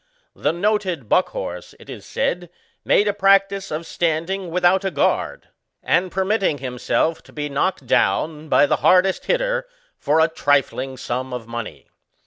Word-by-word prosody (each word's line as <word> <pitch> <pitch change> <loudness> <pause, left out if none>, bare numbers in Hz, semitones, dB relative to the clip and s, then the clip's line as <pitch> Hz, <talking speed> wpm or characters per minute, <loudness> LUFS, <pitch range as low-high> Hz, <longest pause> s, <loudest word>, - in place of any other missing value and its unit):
The - - 0
noted 185 - -1
Buckhorse, 185 - -1
it - - -16
is - - -10
said, 180 -11 -2 0.3
made 205 - +3
a 205 - +1
practice 195 0 +2
of 155 +2 -4
standing 170 +4 -2
without 180 +2 +2
a 195 - 0
guard, 150 -6 -1 0.3
and 180 0 +1
permitting 190 -3 0
himself 130 +5 -1
to - - -19
be 150 -1 -4
knocked 140 +1 -1
down 155 +4 0
by - - +5
the - - +1
hardest 185 +1 +3
hitter, - - 0 0.3
for 150 +3 +2
a 160 - +5
trifling 135 -4 0
sum 130 +2 -4
of 125 -2 -5
money. 115 -1 -7
175 Hz, 150 wpm, -21 LUFS, 145-195 Hz, 0.3 s, by